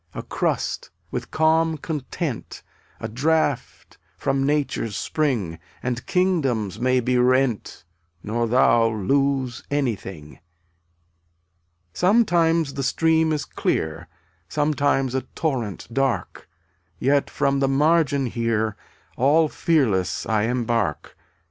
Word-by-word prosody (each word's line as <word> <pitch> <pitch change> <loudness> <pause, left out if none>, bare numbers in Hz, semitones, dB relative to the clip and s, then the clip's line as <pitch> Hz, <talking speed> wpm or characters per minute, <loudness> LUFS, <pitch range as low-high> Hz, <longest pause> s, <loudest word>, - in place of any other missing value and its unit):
A - - -5
crust, - - -2 0.2
with - - -4
calm 160 0 +2
content, 150 -2 -5 0.4
A 110 - -4
draught 145 +3 -1 0.2
from 135 0 0
nature's 140 -7 -1
spring, 115 - -1 0.2
And 125 -1 -3
kingdoms 140 - 0
may 130 +1 +2
be 125 +1 +1
rent 125 -2 +1 0.4
Nor 115 +2 -1
thou 115 -1 +4
lose 130 +4 0
anything. 100 - -3 1.5
163 - - -10
Sometimes 170 -7 +3
the 140 - -3
stream 160 +3 +2
is 150 -2 -1
clear, 80 +1 -2 0.4
Sometimes 145 -2 +1
a 130 - 0
torrent 125 - -2
dark, 130 -9 -1 0.5
Yet 140 +7 +2
from 140 0 0
the 135 - +2
margin 145 0 +2
here 115 -3 -1 0.4
All 150 +5 +4
fearless 120 - +1
I 110 -1 +1
embark. 115 - -1
135 Hz, 105 wpm, -23 LUFS, 115-150 Hz, 1.5 s, thou